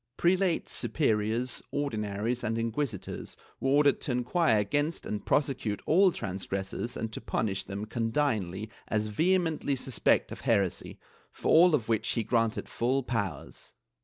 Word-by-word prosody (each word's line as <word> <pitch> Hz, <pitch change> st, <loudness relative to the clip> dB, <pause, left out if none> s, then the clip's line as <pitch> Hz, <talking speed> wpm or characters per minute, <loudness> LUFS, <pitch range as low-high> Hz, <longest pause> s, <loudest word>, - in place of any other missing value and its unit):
Prelates, 180 Hz, 0 st, +2 dB
superiors. 115 Hz, -2 st, 0 dB
Ordinaries 115 Hz, -3 st, -2 dB
and 115 Hz, +1 st, -1 dB
inquisitors 115 Hz, -2 st, -3 dB, 0.2 s
were 135 Hz, -, 0 dB
ordered 145 Hz, 0 st, +4 dB
to -, -, -1 dB
inquire 125 Hz, 0 st, +2 dB
against 145 Hz, +11 st, 0 dB
and 105 Hz, -, -4 dB
prosecute 130 Hz, -8 st, 0 dB
all 185 Hz, +4 st, +5 dB
transgressors 95 Hz, -, -4 dB
and 110 Hz, -1 st, -4 dB
to -, -, -6 dB
pmiish 95 Hz, -3 st, -2 dB
them 100 Hz, +2 st, -4 dB
condignly 110 Hz, -4 st, -1 dB, 0.2 s
as 110 Hz, 0 st, 0 dB
vehemently 160 Hz, -, +1 dB
suspect 130 Hz, -1 st, +1 dB
of -, -, -7 dB
heresy, 100 Hz, -6 st, 0 dB, 0.3 s
for -, -, -3 dB
all 170 Hz, 0 st, +7 dB
of 120 Hz, -7 st, -2 dB
which 110 Hz, -2 st, 0 dB
he 115 Hz, -, 0 dB
granted 115 Hz, -1 st, 0 dB
full 130 Hz, +3 st, 0 dB
powers.' 100 Hz, -, -4 dB
115 Hz, 135 wpm, -29 LUFS, 105-145 Hz, 0.3 s, all